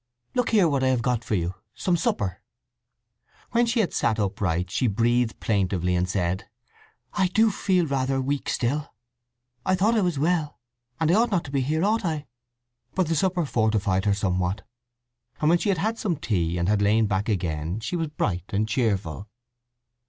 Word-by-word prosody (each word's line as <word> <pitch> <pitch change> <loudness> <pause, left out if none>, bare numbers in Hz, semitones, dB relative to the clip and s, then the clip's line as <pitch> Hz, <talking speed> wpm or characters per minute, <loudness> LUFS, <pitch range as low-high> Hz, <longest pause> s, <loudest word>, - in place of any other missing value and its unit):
Look 250 -1 +1
here, 205 -6 +4
what 140 -4 +1
I - - +3
have 130 -3 +1
got 120 -1 0
for 105 - -1
you. 85 0 -1 0.2
Some 180 - +1
supper." 95 - -1 1.1
When 240 0 +3
she 230 0 +2
had 185 - -1
sat 115 -2 +1
upright 90 -3 -1
she 125 - +1
breathed 115 +2 +1
plaintively 95 -4 0
and 90 +1 0
said, 90 0 -1 0.6
"I 190 -2 +2
do 220 +4 +3
feel 185 -3 +1
rather 135 -2 0
weak 140 +2 -2
still. 145 +4 -1 0.7
I 185 - +2
thought 205 +5 +2
I 220 - +3
was 175 -5 0
well; 155 0 0 0.4
and 160 0 +2
I - - +4
ought 230 +4 +4
not 190 -6 +1
to 135 - -9
be 135 -1 +1
here, 155 +7 0
ought 220 +2 +1
I?" 155 -4 -2 0.7
But 185 -4 +1
the 165 - +1
supper 180 +1 +1
fortified 110 -6 +1
her 100 -1 +3
somewhat, 90 -1 -1 0.7
and 150 - +2
when 175 - +4
she 205 - -1
had 195 - +2
had 220 +6 -1
some 185 -6 0
tea 90 - -1
and 85 0 0
had 105 0 +2
lain 110 +2 +3
back 100 +1 -1
again 85 -2 -2
she 115 - -3
was 165 -2 -1
bright 95 - -2
and 105 +2 0
cheerful. 100 -5 -1
125 Hz, 190 wpm, -25 LUFS, -, 1.1 s, here